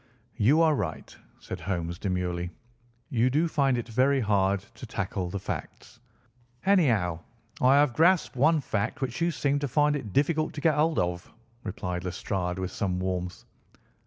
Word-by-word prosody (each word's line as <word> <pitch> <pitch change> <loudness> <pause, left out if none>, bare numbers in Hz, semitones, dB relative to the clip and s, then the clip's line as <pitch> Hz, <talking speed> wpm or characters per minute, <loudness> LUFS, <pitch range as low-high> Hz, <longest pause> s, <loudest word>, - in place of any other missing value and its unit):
"You 140 +10 +4
are 160 -1 +4
right," 95 - -4 0.2
said - - -7
Holmes 85 -2 -3
demurely; 90 -2 -2 0.6
"you 120 0 +3
do 155 +6 +2
find 140 -5 +2
it 120 - -4
very 130 +4 +2
hard 100 -3 +2
to 125 - -10
tackle 95 -3 -3
the 100 - -3
facts." 95 - -7 0.7
"Anyhow, 115 - +3 0.4
I 130 +2 +6
have 145 -3 +4
grasped 170 +3 +3
one 155 +4 +3
fact 100 -6 -2
which 130 +2 -3
you 170 - +3
seem 145 -3 0
to 145 - -2
find 150 +3 +2
it 120 -8 -5
difficult 155 - +1
to 145 - -6
get 160 +1 +4
hold 155 +2 +1
of," 90 0 -2 0.3
replied 90 -3 -4
Lestrade 90 0 -3
with 95 -1 -3
some 95 -2 -1
warmth. 90 -1 -3
115 Hz, 160 wpm, -27 LUFS, 90-145 Hz, 0.7 s, I